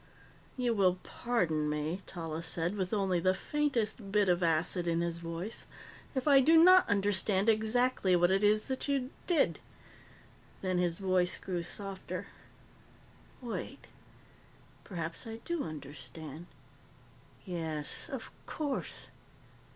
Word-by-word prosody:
"You 245 Hz, -2 st, +1 dB
will 185 Hz, -4 st, +3 dB
pardon 165 Hz, -11 st, 0 dB
me," 150 Hz, +5 st, -2 dB
Tallis 165 Hz, -2 st, -5 dB
said, 170 Hz, +2 st, -1 dB
with 185 Hz, -3 st, -2 dB
only 195 Hz, -4 st, +1 dB
the 185 Hz, +2 st, +2 dB
faintest 230 Hz, -8 st, -1 dB
bit 205 Hz, -2 st, +3 dB
of 175 Hz, 0 st, +3 dB
acid 170 Hz, +1 st, +1 dB
in 165 Hz, 0 st, +1 dB
his 170 Hz, 0 st, -2 dB
voice, 170 Hz, +6 st, -5 dB, 0.5 s
"if 260 Hz, +2 st, -1 dB
I 280 Hz, -2 st, +8 dB
do 320 Hz, +5 st, +6 dB
not 370 Hz, +1 st, +7 dB
understand 200 Hz, 0 st, +2 dB
exactly 220 Hz, -2 st, +3 dB
what 175 Hz, +1 st, +4 dB
it 195 Hz, +2 st, +2 dB
is 210 Hz, +1 st, +4 dB
that 265 Hz, +1 st, -3 dB
you 275 Hz, -2 st, 0 dB, 0.2 s
did." 335 Hz, -6 st, +2 dB, 1.0 s
Then 185 Hz, -2 st, 0 dB
his 175 Hz, -2 st, +1 dB
voice 185 Hz, -2 st, +2 dB
grew 180 Hz, -3 st, -3 dB
softer. 195 Hz, +2 st, -4 dB, 1.2 s
"Wait. 235 Hz, -, -5 dB, 1.0 s
Perhaps 170 Hz, +3 st, -5 dB
I 225 Hz, 0 st, -5 dB
do 340 Hz, -3 st, -1 dB
understand. 150 Hz, +2 st, -8 dB, 1.0 s
Yes, 160 Hz, -5 st, -3 dB
of -, -, -6 dB, 0.2 s
course." 290 Hz, -4 st, -3 dB
190 Hz, 125 wpm, -32 LUFS, 170-225 Hz, 1.2 s, I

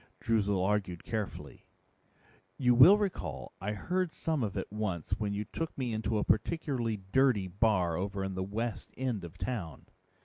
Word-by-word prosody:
Droozle 100 Hz, -4 st, +1 dB
argued 95 Hz, -4 st, -1 dB
carefully, 110 Hz, -3 st, -5 dB, 0.9 s
"You 125 Hz, -2 st, +4 dB
will 150 Hz, +12 st, +9 dB
recall 85 Hz, -, -3 dB
I 105 Hz, +3 st, -2 dB
heard 180 Hz, -, -1 dB
some 160 Hz, -4 st, -1 dB
of 105 Hz, -3 st, -2 dB
it -, -, -1 dB
once 105 Hz, -6 st, -3 dB
when 105 Hz, -2 st, -1 dB
you 105 Hz, +1 st, -2 dB
took 165 Hz, +9 st, -5 dB
me 125 Hz, -4 st, -1 dB
into 110 Hz, 0 st, -1 dB
a 105 Hz, -, +1 dB
particularly 120 Hz, -2 st, 0 dB
dirty 125 Hz, -7 st, +3 dB
bar 90 Hz, -3 st, +2 dB
over 100 Hz, +2 st, -2 dB
in 95 Hz, 0 st, -3 dB
the 95 Hz, -, -3 dB
west 110 Hz, +4 st, -3 dB
end 125 Hz, -7 st, -2 dB
of 85 Hz, +1 st, -9 dB
town. 90 Hz, -, -4 dB
105 Hz, 165 wpm, -31 LUFS, 95-125 Hz, 0.9 s, will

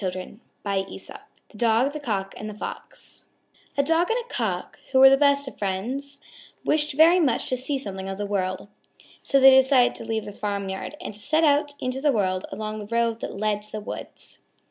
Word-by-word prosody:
_ 185 Hz, +2 st, -5 dB, 0.3 s
THE 195 Hz, -, -4 dB, 0.4 s
DOG, 235 Hz, +5 st, +2 dB
THE 305 Hz, -, -5 dB
COCK, 200 Hz, -8 st, -3 dB
AND 215 Hz, -, -6 dB
THE 210 Hz, -, -8 dB
FOX -, -, -8 dB, 0.5 s
A 280 Hz, -, +4 dB
Dog 330 Hz, +4 st, +2 dB
and 455 Hz, -, +1 dB
a -, -, -14 dB
Cock, -, -, -3 dB
who 265 Hz, -, +2 dB
were 265 Hz, 0 st, +9 dB
the -, -, +7 dB
best 280 Hz, 0 st, +3 dB
of 265 Hz, -, -9 dB
friends, 250 Hz, +9 st, -3 dB, 0.5 s
wished 300 Hz, -1 st, +1 dB
very 325 Hz, +5 st, +6 dB
much 275 Hz, -9 st, +1 dB
to 255 Hz, -, +1 dB
see 265 Hz, +3 st, -1 dB
something 195 Hz, -6 st, -5 dB
of 195 Hz, -, -5 dB
the 205 Hz, -, -3 dB
world. 190 Hz, -1 st, -2 dB, 0.5 s
So 275 Hz, -, +2 dB
they 270 Hz, 0 st, +9 dB
decided 265 Hz, -1 st, +5 dB
to -, -, -4 dB
leave 225 Hz, -1 st, -3 dB
the 205 Hz, -, -8 dB
farmyard 200 Hz, +5 st, -4 dB
and 350 Hz, -, -6 dB
to 205 Hz, -, -7 dB
set 310 Hz, +8 st, +1 dB
out 290 Hz, -1 st, +2 dB
into 255 Hz, +1 st, -3 dB
the 295 Hz, 0 st, +3 dB
world 185 Hz, -5 st, -1 dB
along 215 Hz, 0 st, -5 dB
the 205 Hz, -, -8 dB
road 230 Hz, 0 st, 0 dB
that -, -, -6 dB
led 210 Hz, 0 st, 0 dB
to 210 Hz, -, -10 dB
the 215 Hz, -, -4 dB
woods. 210 Hz, -, -9 dB
235 Hz, 205 wpm, -24 LUFS, 205-280 Hz, 0.5 s, were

